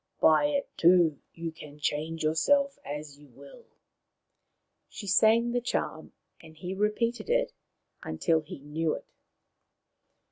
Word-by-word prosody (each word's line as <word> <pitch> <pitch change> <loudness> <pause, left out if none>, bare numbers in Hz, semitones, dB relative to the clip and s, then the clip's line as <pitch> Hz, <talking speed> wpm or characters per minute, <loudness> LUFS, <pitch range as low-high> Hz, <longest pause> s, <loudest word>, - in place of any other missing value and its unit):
By 160 - +5
it, 285 -1 -1
too, 170 -3 +5 0.2
you 165 0 -4
can 150 -2 -12
change 155 +2 -2
yourself 275 - +2
as 145 0 -7
you 145 - -16
will." 140 +2 -15 1.2
She 205 - -8
sang 220 +5 +4
the 245 0 0
charm, 245 - -3 0.3
and 160 0 -15
he 180 +3 -5
repeated 215 - -1
it - - +1 0.5
until 165 -3 +1
4 155 - -13
he - - -8
knew 155 +2 -1
it. - - -9
165 Hz, 135 wpm, -29 LUFS, 150-230 Hz, 1.2 s, By